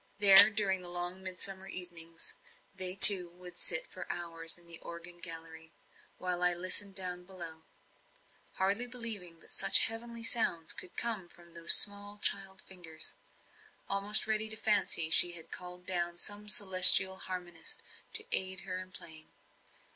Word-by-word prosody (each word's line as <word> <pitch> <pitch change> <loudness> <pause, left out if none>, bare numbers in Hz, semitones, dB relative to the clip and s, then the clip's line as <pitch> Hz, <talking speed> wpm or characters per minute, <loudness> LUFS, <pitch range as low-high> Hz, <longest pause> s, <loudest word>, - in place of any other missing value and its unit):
There 200 0 +8
during 200 -3 -3
the 175 - -2
long 175 +1 -9
midsummer 190 +1 -4
evenings, 170 -3 -7 0.4
they 185 0 -4
two 185 -3 +10
would 180 -1 -14
sit - - -2
for - - -11
hours 165 -1 -4
in 175 - -18
the 170 -1 -9
organ 170 +1 -13
gallery, 160 -1 -12 0.4
while 180 -1 -8
I 180 0 -1
listened 185 +3 0
down 180 -2 -5
below; 170 -4 -14 0.9
hardly 200 +6 -4
believing 215 -9 -5
that - - -12
such - - +1
heavenly 230 +1 -4
sounds 175 -9 -2
could 180 - -15
come 215 -7 -7
from 170 -1 -22
those 170 0 +6
small 205 0 +1
child 195 -2 -3
fingers; 165 -4 -9 0.7
almost 200 +2 +1
ready 220 0 -4
to 220 - -1
fancy 205 -7 +1
she 175 +2 +2
had 165 -1 -13
called 180 0 -13
down 175 -1 -7
some 205 +3 -5
celestial 190 -1 +6
harmonist 180 -3 -9 0.3
to 445 0 -5
aid 190 0 +1
her 185 -1 -9
in 185 0 -17
playing. 160 -3 -12
185 Hz, 150 wpm, -26 LUFS, 175-200 Hz, 0.9 s, two